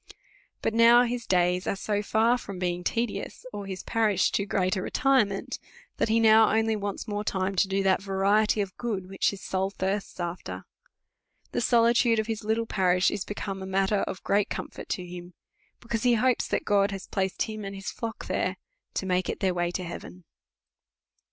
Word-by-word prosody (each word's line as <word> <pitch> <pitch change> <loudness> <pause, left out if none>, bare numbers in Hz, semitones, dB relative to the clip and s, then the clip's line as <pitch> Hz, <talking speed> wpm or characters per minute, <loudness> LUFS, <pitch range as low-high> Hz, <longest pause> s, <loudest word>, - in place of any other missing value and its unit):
But - - 0
now 235 +1 +7
his 245 -1 -3
days 180 0 +2
are - - 0
so 205 +1 -1
far 225 +4 +2
from 200 -5 -7
being 180 -1 -2
tedious, 230 +5 -3
or 205 -1 -5
his 190 -1 -6
parish 215 -4 +2
too 200 - -1
great 185 -1 +1
a 190 - -2
retirement, 230 -5 +1 0.4
that - - +1
he 225 +1 +3
now 220 -1 +6
only 220 0 +2
wants 205 +1 -4
more 205 -1 -2
time 190 -1 -1
to 195 - +4
do 195 0 0
that 190 0 +3
variety 200 +2 +2
of 190 -2 -4
good 205 -6 -3
which 195 0 +1
his 200 - -7
soul 190 0 -1
thirsts 195 0 -3
after. 170 - -5 0.9
The - - -1
solitude 235 0 +4
of 220 - +1
his 225 -1 -4
little 220 +2 0
parish 185 -3 +2
is 205 -2 -3
be 205 - -6
come 195 -2 -5
matter 195 +2 +2
of 185 - -6
great 200 0 +2
comfort - - -6
to 180 - -2
him; 175 0 -9 0.5
because 230 -1 -3
he 245 -1 +4
hopes 250 +2 +2
that - - -1
God 200 -1 +3
has 195 -2 -6
placed 190 -1 -1
him 215 -1 -6
and 195 0 -6
his 195 0 -5
Hock 230 -1 -6
there, - - -1 0.4
to - - -1
make 185 -1 0
it - - -3
their 190 -1 +1
way 175 -1 0
to 180 +1 -3
heaven. 180 +1 -8
200 Hz, 195 wpm, -27 LUFS, 190-220 Hz, 0.9 s, now